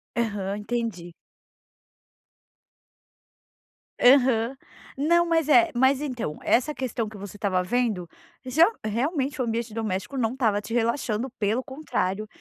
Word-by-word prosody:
Aham, 205 -4 -1
entendi. 210 -6 -4 2.9
Aham. 250 -2 +4 0.4
Não, 340 +5 +3
mas, 325 -3 +2
eh, 340 +3 +6
mas 265 +3 +3
então, 245 - -4
essa 275 +5 +2
questão 245 -5 -3
que 215 0 -10
você 200 +1 -9
estava 190 -4 0
vendo, 215 -4 -1 0.4
ge 265 +5 +1 0.2
realmente 270 - -1
o 250 - 0
ambiente 230 0 -3
doméstico 215 +3 -3
não 225 -1 0
estava 225 -6 +1
te 225 - -7
relaxando, 235 0 0
pelo 220 +4 0
contrário, 215 -8 -3
235 Hz, 120 wpm, -25 LUFS, 210-265 Hz, 2.9 s, eh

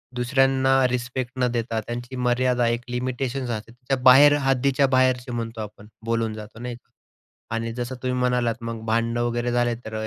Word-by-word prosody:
दुसऱ्यांना 135 +1 +2 0.2
रिस्पेक्ट 125 0 -3
न 125 - +3
देता 115 -1 -2
त्यांची 120 +3 -6
मर्यादा, 125 0 +1
1 120 0 0
लिमिटेशन्स 125 +1 -3
असते. 110 0 -5 0.2
त्या 135 - +1
बाहेर 135 +3 +8
हद्दीच्या 135 +1 +2
बाहेरचे 130 -1 +2
म्हणतो 115 -1 -4
आपण, 105 0 -9 0.2
बोलून 115 -1 0
जातो 110 +1 -10
नाही 120 0 -5
का 120 - -21 0.7
आणि 115 0 -2
जसं 120 +2 -4
तुम्ही 125 0 -1
म्हणालात 125 -2 +1
मग 115 -1 -5
भांडण 115 +1 0
वगैरे 120 0 -1
झाले 120 -1 +1
तर 110 - -7
120 Hz, 165 wpm, -24 LUFS, 115-130 Hz, 0.7 s, बाहेर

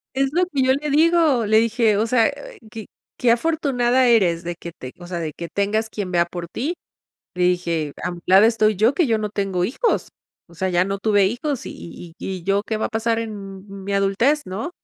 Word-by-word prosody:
Es 270 0 +1
lo 360 +3 +2
que 285 -7 -2
yo 260 0 +4
le 295 +2 -3
digo, 310 -5 +3
le 220 +1 +4
dije: 225 -2 +2
"O 220 - +1
sea, 235 +2 +3 0.4
que 220 -2 -8 0.3
que 240 -2 +3
afortunada 260 -3 +1
eres 180 -8 +3
de 175 0 -4
que 170 0 -9
te 130 -4 -10
o 175 - -10
sea, 175 -1 -4
de 155 -3 -4
que 170 - -7
tengas 215 +2 -1
quien 200 -4 -5
vea 170 -1 +3
por 170 0 -7
ti." 285 - -3 0.6
Le 180 - -2
dije: 170 -4 0
"A 180 - -2
mi 175 - -9
lado 190 +3 +6
estoy 215 -2 +2
yo 220 +7 +3
que 345 -6 +2
yo 225 - +2
no 210 -1 -2
tengo 195 -3 -1
hijos. 285 - 0 0.4
O 170 - -17
sea, 190 +3 -2
ya 180 0 +2
no 195 0 -3
tuve 205 -1 +3
hijos 260 +5 -3
y - - -6
y 170 -1 -11
y - - -5
y 180 - -10
yo, 200 +1 +1
¿qué 220 - -2
va 215 - -1
a - - -6
pasar 225 0 -1
en 200 -4 -7 0.2
mi 200 - -3
adultez, 200 +10 +2
no?, 200 - -4
215 Hz, 230 wpm, -21 LUFS, 185-245 Hz, 0.6 s, lado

